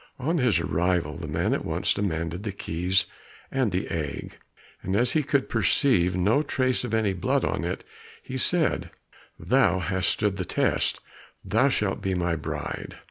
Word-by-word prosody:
On 155 +6 0
his 120 - +3
arrival, 85 -3 0
the - - -6
man - - 0
at - - -1
once - - +1
demanded 85 -2 -2
the 105 -1 -3
keys 95 +1 0 0.5
and 130 -6 +1
the 90 +3 -1
egg, 75 -4 -4 0.4
and 95 - -2
as 120 +3 +3
he 155 - +3
could 140 -1 +1
perceive 95 -3 +2
no 105 +10 +3
trace 130 -4 0
of 120 - -4
any 110 -3 +1
blood 90 - 0
on - - -1
it, - - -3 0.4
he 130 - -7
said, 160 +5 +1 0.5
"Thou 90 - +3
hast 90 -1 0
stood 105 -3 0
the 95 - -1
test, - - 0 0.4
thou 115 +9 +3
shalt 105 -7 0
be 95 -1 -1
my 85 -1 0
bride." 80 - -5
95 Hz, 170 wpm, -26 LUFS, 90-125 Hz, 0.5 s, his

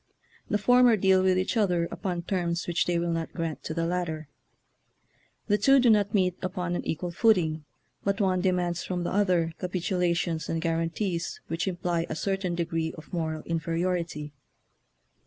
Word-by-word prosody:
The 210 - +2
former 245 +2 +5
deal 190 -1 +4
with 185 -1 +3
each 185 +6 0
other 180 -6 +2
upon 175 -3 -3
terms 175 -2 -1
which 170 -1 0
they 175 -1 +1
will 170 0 0
not 165 -1 -3
grant 165 -3 -3
to - - -3
the 165 0 0
latter. 165 -3 -2 1.2
The 205 0 +2
two 275 0 +6
do 245 -2 +5
not 205 -1 +2
meet 185 -2 +2
upon 180 -1 -2
an - - -3
equal 175 +2 -2
footing, 170 -7 +2 0.4
but 200 +1 0
one 185 -3 +2
demands 180 -2 0
from 180 -1 -3
the - - -2
other 180 -5 +2
capitulations 175 -2 -1
and 165 - 0
guaran 165 0 0
tees 175 -1 -3
which 165 +4 -2
imply 175 -2 -1
a - - -3
certain 195 0 -1
degree 165 -1 -2
of 160 - -13
mor 160 -2 -1
al 155 - -7
inferiority. 165 -2 -2
175 Hz, 175 wpm, -27 LUFS, 165-190 Hz, 1.2 s, two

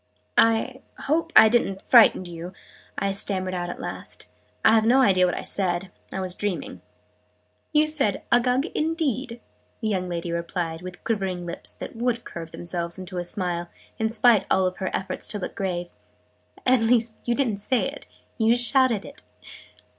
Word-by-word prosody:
"I 230 +4 +2 0.2
hope 325 +3 0
I - - +10
didn't 205 -4 +1
frighten 230 -6 +6
you?" 175 +1 -8 0.4
I 200 - 0
stammered 190 -2 -1
out 175 -1 -3
at - - -6
last. - - -7 0.4
"I - - +8
have 220 -1 +5
no 245 +4 +4
idea 185 -7 +4
what 180 - -2
I - - -4
said. 185 -1 -2 0.2
I - - -4
was 185 -1 -1
dreaming." 205 -1 -3 0.9
"You 305 0 +4
said 285 -10 -1
'Uggug 250 +3 +3
indeed!'" 280 -7 -1 0.4
the 220 - -2
young 185 -3 -1
lady 170 0 -3
replied, 170 -1 -3
with 180 0 -9
quivering 190 -5 -2
lips 170 - -4
that - - -8
would 235 0 -1
curve 165 -1 -8
themselves 170 +1 -2
into 185 -1 -6
a - - -2
smile, 175 -2 -2 0.3
in 220 0 +1
spite 225 -1 +4
of - - -28
all 185 -1 +3
her 190 - -1
efforts 190 0 -2
to 210 - -1
look 200 - -5
grave. 175 -3 -3 0.7
"At 255 -2 +4
least 225 0 +2
you 240 - +1
didn't 235 -7 0
say 240 +5 0
it - - -8 0.3
you 225 +1 +4
shouted 245 -2 +2
it!" 285 +1 -12
200 Hz, 170 wpm, -24 LUFS, 180-240 Hz, 0.9 s, I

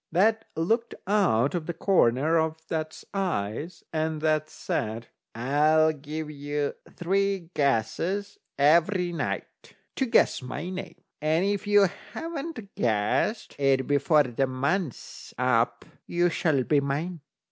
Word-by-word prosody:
That 220 +6 +3
looked 225 +9 0
out 180 - +2
of 170 -3 -3
the 170 - -3
corner 160 -3 +3
of 160 0 0
that's 155 -1 -4
eyes, 165 - -2
and 155 0 -1
that 155 -1 +1
said: 115 -2 -3 0.3
"I'll 150 +6 +3
give 150 +1 -6
you 145 0 -2 0.2
three 195 -1 0
guesses 165 - 0 0.2
every 170 +5 +3
night - - -5 0.2
to 265 - +1
guess 230 - +3
my 145 +8 -5
name, 185 -2 -6 0.3
and 160 +4 +2
if 205 0 -1
you 205 -1 +6 0.3
haven't 320 -10 -6
guessed 115 - 0
it 135 -2 +3
before 145 +2 +4
the 130 +1 -1
month's 140 - -3
up 125 -2 +1 0.2
you 175 0 +2
shall 160 -6 +1
be 145 +3 +3
mine." 150 +5 -3
155 Hz, 125 wpm, -27 LUFS, 140-185 Hz, 0.3 s, you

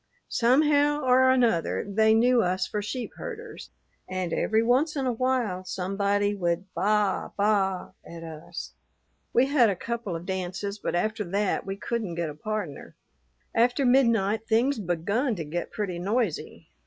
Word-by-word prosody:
"Somehow 290 +4 +3
or 260 0 +5
another 235 -12 +2
they 220 +2 +3
knew 245 +1 +4
us 185 -1 0
for 210 - -3
sheep 235 +4 -4
herders, 480 -1 -8 0.4
and 185 -2 -2
every 220 +1 +2
once 265 +7 +2
in 275 -2 -1
a 255 - +1
while 240 -6 0
somebody 200 +2 0
would 180 0 -2
baa 210 -1 +1
baa 200 -3 +1
at 165 0 -10
us. 160 -1 -8 0.6
We 245 - +4
had 265 -5 +4
a 200 - 0
couple 230 -1 -4
of 165 +1 -6
dances, 190 +2 -4
but - - -2
after 215 +4 0
that 195 +2 -1
we 195 - -3
couldn't 210 -4 -3
get 170 -2 -2
a - - -9
pardner. 175 -2 -5 0.6
After 245 +4 +2
midnight 225 -4 +3
things 235 +3 +2
begun 200 - -1
to 170 - -4
get 170 +3 -4
pretty 190 -5 -3
noisy. 205 -1 -2
210 Hz, 155 wpm, -26 LUFS, 185-245 Hz, 0.6 s, or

